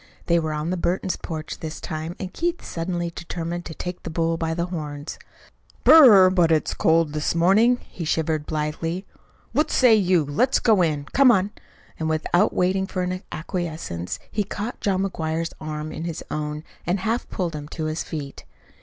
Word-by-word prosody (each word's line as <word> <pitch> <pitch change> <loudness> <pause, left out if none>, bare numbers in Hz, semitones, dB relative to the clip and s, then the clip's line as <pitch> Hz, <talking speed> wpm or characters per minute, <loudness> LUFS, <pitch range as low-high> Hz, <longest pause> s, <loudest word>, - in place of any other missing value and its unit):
They 170 0 +3
were 160 -1 -2
on 150 +3 -2
the 185 - -1
Burton 180 +2 0
porch 155 -2 -5
this 155 -1 -6
time, 160 0 -5
and 190 -1 -6
Keith 345 0 -2
suddenly 175 0 -3
determined 175 0 -5
to 160 - -7
take 180 0 -5
the - - -6
bull 165 0 0
by 165 0 -2
the 170 0 -1
horns. 150 -4 -6 0.7
"Brrr! 210 -12 +9
but 175 -3 +3
it's 155 -1 +2
cold 160 -2 +2
this 150 +2 -1
morning," 205 +9 +4
he 175 - -7
shivered 155 -1 -1
blithely. 165 +4 -2 0.5
"What 300 +6 +1
say 250 -3 +5
you? 185 -6 +3
Let's 145 - +2
go 215 -5 +4
in. 155 -4 +1
Come 275 -2 +6
on." 200 -3 +3 0.5
And 160 0 -1
without 170 +5 +2
waiting 190 +1 +1
for 185 -2 -2 0.2
acquiescence, 155 - -4
he 210 - 0
caught 210 +4 -5
John 195 -1 +1
McGuire's 165 -3 -2
arm 155 0 -4
in 160 +1 -5
his 170 -2 -4
own 150 0 -3 0.2
and 180 +2 -1
half 225 +4 -1
pulled 175 -5 -2
him 145 -1 -6
to 160 0 -5
his 155 +1 -2
feet. 145 -3 -6
170 Hz, 180 wpm, -24 LUFS, 155-185 Hz, 0.7 s, Brrr